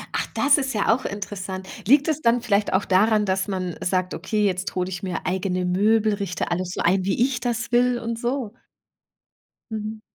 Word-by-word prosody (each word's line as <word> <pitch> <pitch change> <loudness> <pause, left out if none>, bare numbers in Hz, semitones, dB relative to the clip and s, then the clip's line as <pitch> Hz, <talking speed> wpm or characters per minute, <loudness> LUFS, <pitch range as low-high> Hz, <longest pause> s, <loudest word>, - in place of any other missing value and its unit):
Ach, - - -1
das 285 +1 +4
ist 270 -1 -2
ja 210 +1 +3
auch 260 +3 -3
interessant. 190 -2 -5 0.2
Liegt 280 +5 +5
es 310 -1 0
dann 235 -1 +3
vielleicht 205 -3 +1
auch 190 +2 +2
daran, 210 +3 +3
dass 190 0 0
man 185 -3 -3
sagt: 185 0 0
„Okay, 210 +5 -1
jetzt 185 0 -1
hole 180 -1 0
ich 185 -1 -5
mir 185 -2 -4
eigene 185 0 -1
Möbel, 210 +4 +2
richte 200 -4 -3
alles 175 +1 -1
so - - -2
ein, 185 +2 +2
wie 190 +3 -1
ich 265 -2 -2
das 235 -1 -2
will 245 0 +3
und 230 -1 -4
so?“ 240 -2 -2 1.2
Mhm. 215 0 -5
205 Hz, 195 wpm, -23 LUFS, 185-230 Hz, 1.2 s, Liegt